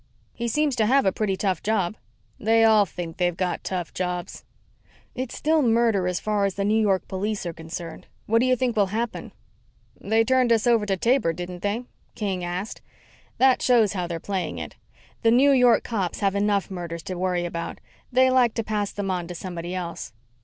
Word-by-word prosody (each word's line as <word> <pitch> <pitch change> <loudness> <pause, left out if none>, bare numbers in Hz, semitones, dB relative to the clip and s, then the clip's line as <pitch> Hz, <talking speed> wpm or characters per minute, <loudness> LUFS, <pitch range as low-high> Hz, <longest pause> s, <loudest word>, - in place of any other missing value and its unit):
"He 235 - -3
seems 295 +2 +1
to 215 -2 +3
have 270 +3 +4
a 190 - +4
pretty 200 -1 -1
tough 185 -4 -1
job." 210 -3 0 0.4
"They 225 +1 +3
all 215 -2 +5
think 165 -1 -7
they've 175 -1 0
got 185 -1 -2
tough 180 -3 -4
jobs." 180 -1 -4 0.7
"It's 255 -1 -5
still 315 +1 +2
a - - +3
murder 230 -6 +2
as 180 0 -1
far 210 -2 0
as 195 - -2
the 200 - -1
New 215 +2 +3
York 195 -4 +1
police 200 +1 -3
are 170 - -3
concerned. 165 +1 -8 0.2
What 225 +2 +3
do 250 - +2
you 255 - +4
think 250 -1 -1
will 205 -2 +3
happen?" 225 +4 -4 0.7
"They 220 +2 +2
turned 255 0 +2
us 225 -2 +3
over 230 -3 +3
to 195 -1 0
Taber, 235 -5 +2
didn't 175 +1 -7
they?" 205 +4 -1 0.3
King 195 -5 -2
asked. 180 +4 -4 0.6
"That 260 -1 +4
shows 230 -5 +4
how 180 -3 -2
they're 170 -1 -4
playing 190 +1 -3
it. - - -7 0.5
The 225 - +4
New 260 +5 +5
York 250 -3 +5
cops 195 -7 -3
have 195 -1 +2
enough 200 -1 0
murders 170 -3 -5
to 185 - -5
worry 180 -1 -1
about. 170 -1 -5 0.3
They 260 +1 +4
like 250 -3 +3
to 230 - -1
pass 210 -2 -2
them 200 -2 -3
on 175 -2 -2
to 180 - -7
somebody 175 0 -5
else." 170 -8 -5
200 Hz, 205 wpm, -24 LUFS, 180-230 Hz, 0.7 s, all